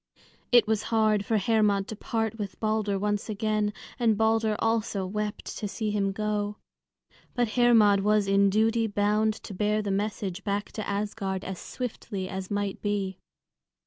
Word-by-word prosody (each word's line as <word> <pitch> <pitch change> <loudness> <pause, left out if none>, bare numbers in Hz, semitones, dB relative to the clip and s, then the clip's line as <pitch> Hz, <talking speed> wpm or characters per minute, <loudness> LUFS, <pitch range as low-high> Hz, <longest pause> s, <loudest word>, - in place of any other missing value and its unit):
It 240 -3 +7
was 220 -1 +1
hard 215 -2 +3
for 220 +2 +1
Hermod 205 -1 +2
to 220 - -4
part 225 +1 -2
with 200 -2 -5
Balder 215 -2 0
once 205 +2 -1
again, 215 0 0 0.3
and 225 -3 +3
Balder 220 0 +2
also 225 -4 0
wept 210 +2 -3
to 210 - -2
see 215 +1 -3
him 200 -1 0
go. 210 0 -2 0.8
But 240 -2 +1
Hermod 225 -4 +5
was 210 0 +2
in 195 0 +4
duty 225 +3 +2
bound 210 +1 +1
to 205 - -7
bear 210 +2 0
the 200 - -2
message 200 -1 -2
back 205 0 -2
to 215 - -5
Asgard 200 -2 -2
as 190 -1 -5
swiftly 215 -6 -5
as 190 -1 -5
might 205 -1 -2
be. 200 -2 -2
210 Hz, 160 wpm, -27 LUFS, 200-220 Hz, 0.8 s, It